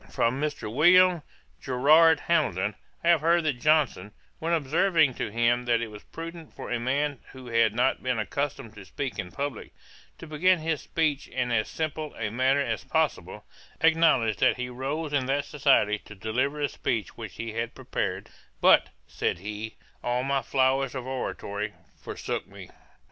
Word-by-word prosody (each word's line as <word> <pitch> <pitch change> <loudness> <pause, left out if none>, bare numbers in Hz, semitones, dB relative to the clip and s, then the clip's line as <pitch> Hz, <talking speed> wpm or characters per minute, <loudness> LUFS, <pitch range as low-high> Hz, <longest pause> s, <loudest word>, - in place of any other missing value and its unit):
From 125 +4 0
Mr. 145 -8 -3
William 175 +4 +5 0.4
Gerrard 150 +5 +5
Hamilton 100 - +1 0.3
I 170 - +2
have 170 -4 +5
heard 170 +1 +3
that 140 -6 -1
Johnson, 145 -11 +2 0.3
when 165 +1 -2
observing 160 -1 +2
to - - -4
him 120 +2 +1
that 120 -1 +2
it 115 -1 -4
was 105 -1 -11
prudent 165 -1 -9
for - - -7
a 125 - 0
man 140 +3 -1
who 130 -1 -11
had 115 -2 +2
not 125 +2 +1
been 125 -2 -1
accustomed 135 +1 -3
to 105 -2 -11
speak 130 +8 -5
in 90 0 -5
publick, 140 -4 -5 0.5
to - - -10
begin 170 +4 +2
his 160 -2 -2
speech 155 -4 -1
in 125 -2 -2
as 110 -2 +1
simple 155 -1 -4
a 110 -2 -3
manner 130 +4 +2
as 115 -6 -2
possible, - - -1 0.4
acknowledged 160 - +3
that - - +3
he 125 0 -4
rose 140 +5 -4
in 135 -3 +1
that 140 +1 0
society 135 -8 +2
to 105 - -13
deliver 125 +9 -1
a 145 - +1
speech 110 -6 -3
which 110 -4 -8
he 115 -1 -5
had 115 +1 -3
prepared; 100 -7 -3 0.3
'but - - +5 0.2
(said - - -2
he), 105 +4 -6 0.3
all 125 +1 0
my 135 0 0
flowers 130 +1 +1
of 130 -2 -4
oratory 105 -5 -4 0.3
forsook - - -5
me.' - - -12
130 Hz, 170 wpm, -27 LUFS, 115-150 Hz, 0.5 s, William